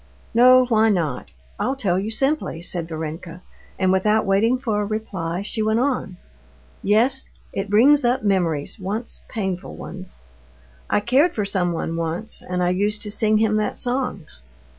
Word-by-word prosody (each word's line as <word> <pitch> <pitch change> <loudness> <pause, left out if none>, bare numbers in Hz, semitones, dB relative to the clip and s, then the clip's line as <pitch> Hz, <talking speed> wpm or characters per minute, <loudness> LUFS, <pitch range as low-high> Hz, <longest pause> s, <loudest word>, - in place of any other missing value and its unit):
"No, 255 +2 +7
why 225 -2 +3
not? 155 - -1 0.3
I'll 265 - 0
tell 190 -9 0
you 205 +3 -3
simply," 270 - 0
said 175 -2 -1
Varenka, 165 +2 -6 0.3
and, 185 -1 +2
without 210 +3 +2
waiting 210 +6 +2
for 225 -5 -1
a - - -1
reply, 195 -5 -3
she 220 +2 -3
went 220 +1 +1
on: 250 -8 -1 0.6
"Yes, 240 +6 +2 0.2
it 195 +1 -3
brings 265 +8 +5
up 245 -1 +1
memories, 175 -6 0
once 205 +5 -5
painful 190 -5 -4
ones. 185 0 -9 0.7
I 210 - +2
cared 265 +10 +2
for 210 - -1
someone 175 -4 -1
once, 170 +7 -4
and 180 0 -2
I 175 - +2
used 205 +4 0
to 210 - -5
sing 215 0 +2
him 215 0 +2
that 215 - -1
song." 245 - -1
210 Hz, 160 wpm, -22 LUFS, 180-230 Hz, 0.7 s, No